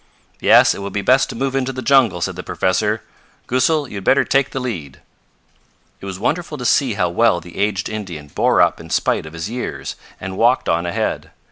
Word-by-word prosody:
"Yes, - - +6
it - - -8
will 100 0 -4
be 100 0 -3
best 130 +1 +3
to - - -6
move 135 0 -2
into 135 0 0
the 130 -1 -6
jungle," 120 -11 +3
said - - -2
the - - -5
professor. 105 +4 0 0.4
"Goosal, 140 +4 +1
you 105 - -8
had 100 - -6
better 135 - +4
take 135 0 +2
the 135 - -4
lead." 85 - -5 1.0
It 100 - -8
was 95 -1 -5
wonderful 150 - -2
to 125 - -6
see 125 -3 +2
how 90 -3 +1
well 105 +1 +3
the 85 +1 -13
aged 100 -2 0
Indian 95 -9 -6
bore - - +2
up - - +1
in - - -11
spite - - 0
of 75 - -11
his 80 +2 -4
years, 120 +3 -5 0.2
and 95 0 -6
walked 120 +3 +3
on 85 +1 +1
ahead. 85 - -2
105 Hz, 215 wpm, -19 LUFS, 90-130 Hz, 1.0 s, Yes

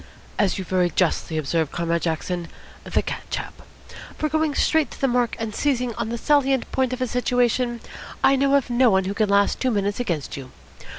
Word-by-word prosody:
"As 200 -3 +2
you 190 - -3
very 180 -1 +1
justly 170 -2 0
observe, 155 +1 0
Comrade 170 0 -1
Jackson, 170 +1 -2 0.4
the - - 0
cat - - -4
chap. - - -5 0.6
For 305 - -1
going 315 -1 0
straight 315 -2 +2
to - - -12
the 270 - +2
mark 245 -1 +1
and 225 -1 -4
seizing 250 -3 0
on 220 - -3
the 235 - -3
salient 270 -1 +2
point 260 -1 +1
of 255 0 -4
a - - -1
situation, 245 0 0 0.4
I 275 - +6
know 275 +1 +3
of 270 -3 +1
no 245 +1 +5
one 190 -2 +3
who 190 +2 -2
can 210 0 +1
last 200 0 +3
two 260 - +1
minutes 205 -2 -1
against 170 - -2
you. 135 -2 -8
235 Hz, 200 wpm, -23 LUFS, 185-260 Hz, 0.6 s, I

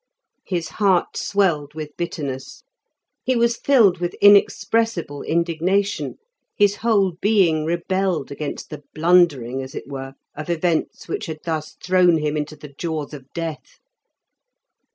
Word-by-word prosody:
His 175 -4 -2
heart 195 -4 +1
swelled 155 -7 0
with 150 -2 -7
bitterness; 140 -6 -5 0.6
he 255 - +1
was 235 0 +2
filled 225 -11 +4
with 175 -1 -2
inexpressible 205 -5 +3
indignation, 170 +5 0 0.4
his 205 0 +3
whole 200 -6 +1
being 185 -7 +3
rebelled 175 -1 -1
against 145 +1 -6
the 150 - -7
blundering, 155 -7 +3
as 130 0 -9
it - - -6
were, 135 -1 -7 0.2
of 155 +2 -7
events 170 -1 -1
which 165 - -4
had 155 -1 -6
thus 160 -2 -3
thrown 180 -2 +4
him 150 -1 -1
into 150 0 -3
the 150 -1 -12
jaws 155 -2 -4
of 135 -2 -11
death. 165 -3 -5
170 Hz, 135 wpm, -22 LUFS, 150-190 Hz, 0.6 s, filled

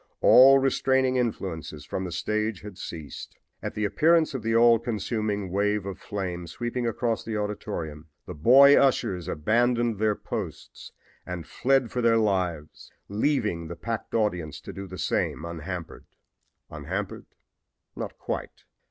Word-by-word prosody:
All 135 +2 +8
restraining 130 -1 +2
influences 80 - -3
from 95 - -4
the 90 - -5
stage 110 +3 -2
had 105 -2 -9
ceased. 80 -4 -8 0.2
At - - -5
the 105 - 0
appearance 155 +10 +3
of 130 - -3
the 115 +1 0
all 115 0 +6
consuming 105 -3 -2
wave 105 +1 0
of 95 -1 -6
flame 90 -4 -5
sweeping 120 +7 -3
across 115 0 -1
the 110 -1 -3
auditorium 80 -7 -4 0.2
the 90 - -7
boy 135 - +7
ushers 95 -10 +2
abandoned 115 +6 +1
their 110 -1 +2
posts - - -7 0.3
and 90 -3 -6
fled 130 - +1
for 125 - -1
their 115 -1 +4
lives, 90 -8 -1 0.2
leaving 105 - 0
the 85 - -6
packed 115 +3 -5
audience 90 -9 -1
to - - -9
do 100 0 -7
the 95 0 -9
same 80 - -1
unhampered. 85 +1 -6 0.7
Unhampered 90 +7 -5 0.7
not - - -6
quite! - - -5
105 Hz, 145 wpm, -26 LUFS, 90-120 Hz, 0.7 s, All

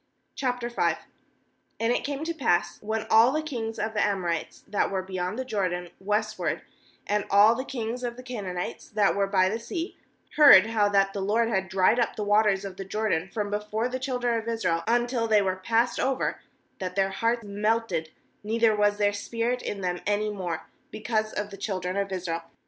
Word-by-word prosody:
K 265 - -2 1.3
And 230 +1 +2
it - - -1
came 285 +1 -3
to 335 +1 -2
pass, 175 - 0
when 220 +1 -2
all 225 +3 +7
the 310 +2 -1
kings 230 -7 -4
of 220 +1 -2
the 210 - +2
Amorites, 180 -5 -2
that 205 - 0
were 190 -1 -2
beyond 185 +2 -3
the 260 - -3
Jordan 180 -6 -2
westward, 210 +2 -1 0.4
and 210 0 0
all 205 +3 +7
the 255 +2 -3
kings 245 -2 -4
of 240 0 -3
the 255 - -9
Canaanites, 200 -8 -5
that 210 -2 +2
were 200 0 +1
by 190 -2 +3
the 220 +4 -2
sea, 330 +9 -5 0.4
heard 280 -11 +9
how 215 -2 +2
that 195 -1 +2
the 200 - -3
LORD 225 +4 +1
had 190 -4 -1
dried 190 +5 +3
up 235 - 0
the 210 - -3
waters 205 -1 +3
of 190 -1 -7
the 195 - -4
Jordan 195 -3 -1
from 205 -2 -3
before 210 +3 -1
the 255 +1 -4
children 245 -3 0
of 225 - -9
Israel, 180 -8 0
until 240 0 +1
they 210 -2 +4
were 185 -1 0
passed 230 +6 +1
over, 265 0 0 0.4
that 185 -1 -4
their 195 -1 +1
heart 230 +4 0
melted, 205 -5 -1 0.3
neither 225 +1 +2
was 205 0 +2
there 205 -1 +2
spirit 230 +4 -2
in 200 - -4
them 180 -1 -1
any 210 +1 +1
more, 180 -5 -4 0.2
be 215 - -8
cause 215 -1 0
of 205 0 -4
the 195 - -8
children 185 -3 -3
of 200 0 -1
Israel. 175 -3 -3
210 Hz, 195 wpm, -27 LUFS, 195-230 Hz, 1.3 s, heard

